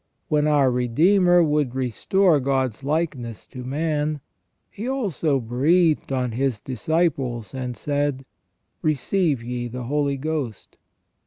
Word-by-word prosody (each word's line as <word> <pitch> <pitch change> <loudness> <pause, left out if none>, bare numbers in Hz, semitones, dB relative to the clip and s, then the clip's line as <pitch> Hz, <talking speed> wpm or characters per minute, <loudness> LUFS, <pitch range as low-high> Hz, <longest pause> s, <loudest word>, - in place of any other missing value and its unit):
When 150 -1 +2
our 145 -4 +4
Redeemer 175 - +4
would 150 -5 0
restore 150 - +2
God's 130 -2 -1
likeness 140 -7 -2
to 125 - -9
man, 150 +2 -1 0.5
He 215 +4 -6
also 175 - 0
breathed 150 +8 +2
on 125 -2 0
His 125 -1 -1
disciples, 130 - -1
and 125 -2 -4
said: 145 -2 -1 0.3
' - - -50
Receive 155 -2 0
ye 120 0 -3
the 125 +1 -6
Holy 140 +2 0
Ghost 140 -7 -4
140 Hz, 125 wpm, -23 LUFS, 125-155 Hz, 0.5 s, our